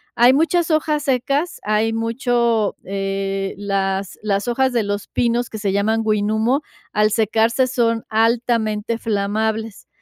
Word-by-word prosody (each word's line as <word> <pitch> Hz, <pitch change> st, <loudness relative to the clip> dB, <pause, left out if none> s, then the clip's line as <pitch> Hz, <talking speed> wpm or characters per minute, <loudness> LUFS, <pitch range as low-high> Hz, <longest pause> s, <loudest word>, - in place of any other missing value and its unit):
hay 240 Hz, +2 st, +6 dB
muchas 330 Hz, +4 st, +2 dB
hojas 310 Hz, -1 st, +1 dB
secas, 275 Hz, +4 st, 0 dB
hay 215 Hz, +2 st, +1 dB
mucho, 230 Hz, -1 st, 0 dB
eh, 195 Hz, 0 st, -3 dB
las 195 Hz, -1 st, -2 dB
las 200 Hz, +1 st, -1 dB
hojas 260 Hz, +2 st, +1 dB
de 235 Hz, -3 st, +1 dB
los 205 Hz, 0 st, -3 dB
pinos 240 Hz, 0 st, 0 dB
que 220 Hz, -, -7 dB
se 205 Hz, -2 st, -1 dB
llaman 215 Hz, +3 st, +1 dB
huinumo, 220 Hz, +6 st, +1 dB, 0.3 s
al 210 Hz, 0 st, +3 dB
secarse 225 Hz, +3 st, +2 dB
son 230 Hz, -3 st, 0 dB
altamente 225 Hz, -1 st, 0 dB
flamables. 220 Hz, +1 st, -2 dB
225 Hz, 130 wpm, -20 LUFS, 205-240 Hz, 0.3 s, hay